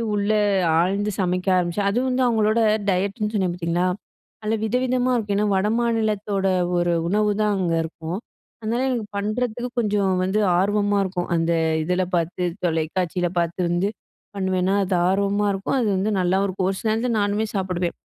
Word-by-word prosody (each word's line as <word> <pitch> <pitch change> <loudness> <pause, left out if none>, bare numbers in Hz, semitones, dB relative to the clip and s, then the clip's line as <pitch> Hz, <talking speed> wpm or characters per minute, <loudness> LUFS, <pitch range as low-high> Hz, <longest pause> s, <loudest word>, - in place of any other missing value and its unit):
உள்ள 205 +1 0 0.5
ஆழ்ந்து 200 +4 +1
சமைக்க 180 0 -1
ஆரம்பிச்சேன், 180 +3 0
அது 235 - +1
வந்து 255 0 0
அவங்களோட 220 -1 +2 0.3
டயட்டுன்னு 200 +3 -1
சொன்னேன் 185 -4 0
பாத்தீங்களா, 175 +1 -1 0.6
நல்ல 215 - 0
வித, 220 +2 -1
விதமா 255 0 +1
இருக்கும். 210 -4 -1
ஏன்னா 210 - +2
வடமாநிலத்தோட 210 -2 0 0.3
ஒரு 175 0 +1 0.2
உணவுதான் 210 +1 +1
அங்க 175 -3 0
இருக்கும். 160 +2 -5 0.4
அதனால 230 +3 -1
எனக்கு 240 -4 -1
பண்றதுக்கு 230 +4 -2
கொஞ்சம் 205 -4 +1
வந்து 190 +3 0 0.2
ஆர்வமா 205 +1 +1
இருக்கும். 180 -2 -3
அந்த 165 0 +1 0.3
இதுல 180 +3 0
பாத்து, 175 +2 -1 0.2
தொலைக்காட்சில 175 +2 0
பாத்து 170 +1 -1
வந்து, 175 +3 +1 0.5
பண்ணுவேன்னா 190 0 0
அது 185 -1 0
ஆர்வமா 200 +1 +1
இருக்கும், 195 +7 -1
அது 220 - +1
வந்து 210 +3 0
நல்லாவும் 190 +2 +2
இருக்கும். 185 0 -1
ஒரு 190 - -5
சில 220 - 0
நேரத்துல 225 +1 0
நானுமே 205 +2 0
சாப்டுவேன். 180 -2 -2
200 Hz, 150 wpm, -23 LUFS, 180-215 Hz, 0.6 s, அவங்களோட